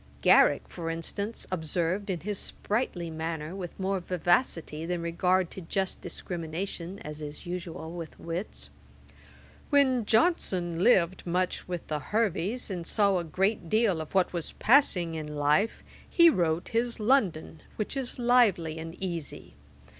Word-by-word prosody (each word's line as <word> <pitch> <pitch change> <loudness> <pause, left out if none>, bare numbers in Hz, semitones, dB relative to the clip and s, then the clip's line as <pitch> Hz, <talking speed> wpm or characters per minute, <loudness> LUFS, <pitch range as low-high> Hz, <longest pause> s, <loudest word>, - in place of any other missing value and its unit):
Garrick, - - +5
for 165 -2 -5
instance, 200 +7 -3
observed 180 +3 -1
in 175 -4 -2
his 205 +1 -3
sprightly 200 -6 -2
manner, 160 +1 -4
with 180 -2 -7
more 195 0 0
vivacity 175 -3 0
than 175 +1 -2
regard 180 +2 +1
to 190 - -8
just 190 +3 -2
discrimination, 175 +2 -5
as 150 0 -7
is 150 0 -7
usual 170 -2 -5
with 170 -2 -8
wits, 170 +5 -5 1.0
'When 265 -5 +4
Johnson 185 - +2
lived 185 -6 +3
much 180 +1 -1
with 175 -2 -4
the 150 -1 -2
Herveys, 215 - -1
and 175 -3 -4
saw 200 -3 +3
a - - -3
good 185 +2 -1
deal 215 -6 +2
of 155 - -9
what 185 -1 +3
was 170 -3 -3
passing 200 - +3
in 150 -1 -5
life, 150 +9 +1 0.3
he 340 -1 +7
wrote 170 - 0
his 235 +1 0
London, 210 - +1
which 215 +5 -3
is 265 -3 -3
lively 220 -10 +3
and 165 +1 -7
easy. 170 -6 -6
180 Hz, 145 wpm, -28 LUFS, 165-205 Hz, 1.0 s, he